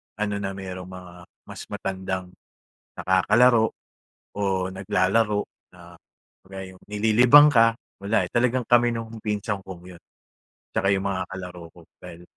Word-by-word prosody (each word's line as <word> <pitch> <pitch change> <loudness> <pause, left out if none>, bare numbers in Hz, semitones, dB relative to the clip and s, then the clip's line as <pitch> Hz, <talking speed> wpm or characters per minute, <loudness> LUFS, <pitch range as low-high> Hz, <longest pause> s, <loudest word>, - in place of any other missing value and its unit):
ano, 105 -1 -2
na 95 -1 -3
merong 95 -1 -7
mga 90 -1 -11 0.3
mas - - -10
matandang 95 -1 -5 0.6
nakakalaro 110 +5 +3 0.7
o - - -3 0.3
naglalaro 100 +3 +1 0.3
na 85 -1 -15 0.5
kagaya 95 0 -9
'yung - - -21
nililibang 115 +8 +6
ka, 115 -3 +4 0.3
wala, 100 +3 +1
eh, - - -24
talagang 125 +1 +1
kami 120 0 +4
nung 115 -1 -6
pinsan 105 -1 -2
kong 95 -2 -10
'yun, 85 - -18 0.7
tsaka 95 - +1
yung 95 0 -3
mga 95 -1 -2
kalaro 90 -2 -8
ko 85 - -15 0.2
dahil 85 - -11
95 Hz, 135 wpm, -24 LUFS, 95-115 Hz, 0.7 s, nililibang